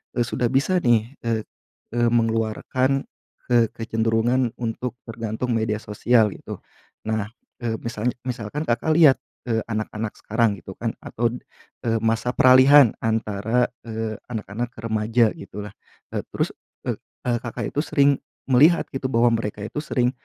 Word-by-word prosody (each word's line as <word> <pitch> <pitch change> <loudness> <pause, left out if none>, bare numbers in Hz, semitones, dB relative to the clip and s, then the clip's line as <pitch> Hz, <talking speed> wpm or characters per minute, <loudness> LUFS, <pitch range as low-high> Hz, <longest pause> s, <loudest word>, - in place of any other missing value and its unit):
eee, 120 - +2
sudah 120 -1 0
bisa, 140 +8 +2
nih, 120 +2 +2
eee 115 -2 0 0.5
eee, 120 0 +3
mengeluarkan, 115 +4 +1 0.5
ke 120 -1 +5
kecenderungan 115 +2 +1
untuk 120 +1 -4
tergantung 115 +1 -4
media 110 -2 +1
sosial 110 0 +2
gitu. - - -8 0.5
Nah, 110 -2 -1 0.4
eee, 115 -1 0
misalnya 115 +1 -2
misalkan 120 +4 -3
Kakak 120 +7 +1
lihat, 155 -6 +7 0.3
eee, 110 -1 +1
anak-anak 110 -1 -3
sekarang 110 -1 +1
gitu 95 - -10
kan, 115 -1 -2
atau, 115 0 -1 0.6
eee, 115 0 +2
masa 115 +2 +1
peralihan 130 0 +7
antara, 110 +2 +1 0.2
eee, 110 -1 -4
anak-anak 115 +1 -4
remaja 110 +1 +2
gitulah, 105 +1 -8 0.4
e - - +1 0.2
terus, - - 0 0.4
e - - 0 0.3
eee, 120 -1 +2
Kakak 120 - -4
itu - - +1
sering 140 -2 +3 0.3
melihat 150 +7 +5
gitu 135 0 -5
bahwa 120 -1 +3
mereka 105 -2 -4
itu 110 - -7
sering 125 -4 +1
115 Hz, 140 wpm, -23 LUFS, 110-125 Hz, 0.6 s, lihat